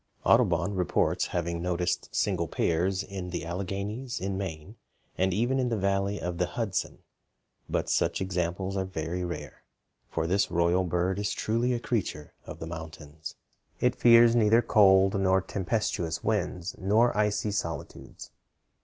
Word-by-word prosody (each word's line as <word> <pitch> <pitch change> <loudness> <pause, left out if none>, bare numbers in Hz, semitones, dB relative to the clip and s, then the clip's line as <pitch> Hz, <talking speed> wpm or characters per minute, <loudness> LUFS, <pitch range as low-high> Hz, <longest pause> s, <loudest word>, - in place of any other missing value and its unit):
Audubon 90 +4 +3
reports 90 -3 +1
having 85 -1 -2
noticed 90 0 -1
single - - 0
pairs 95 +4 0
in 95 -2 -6
the 85 -3 -4
Alleghanies, 100 +8 -4
in 95 +1 -3
Maine, 95 +1 -6 0.4
and 95 +1 +1
even 120 +8 +1
in 125 -1 +1
the 115 - 0
valley 100 +1 0
of 90 -1 -4
the 90 - +1
Hudson; 105 -2 -3 0.7
but - - -1
such - - +1
examples 95 +1 -2
are 95 - 0
very 90 -1 -4
rare, 85 -1 -6 0.5
for 80 - -2
this 95 +4 +1
royal 85 +2 +2
bird 90 +3 0
is 105 - -1
truly 115 +3 0
a 120 - 0
creature 100 -11 -3
of - - -7
the - - -6
mountains. 80 -2 -8 0.4
It - - +2
fears 115 0 +6
neither 115 +1 +4
cold 95 -2 +5
nor 95 0 +3
tempestuous 95 -2 -2
winds 95 -4 -1
nor 110 +5 +3
icy 105 0 +1
solitudes. 85 -7 -5
95 Hz, 145 wpm, -28 LUFS, 85-105 Hz, 0.7 s, fears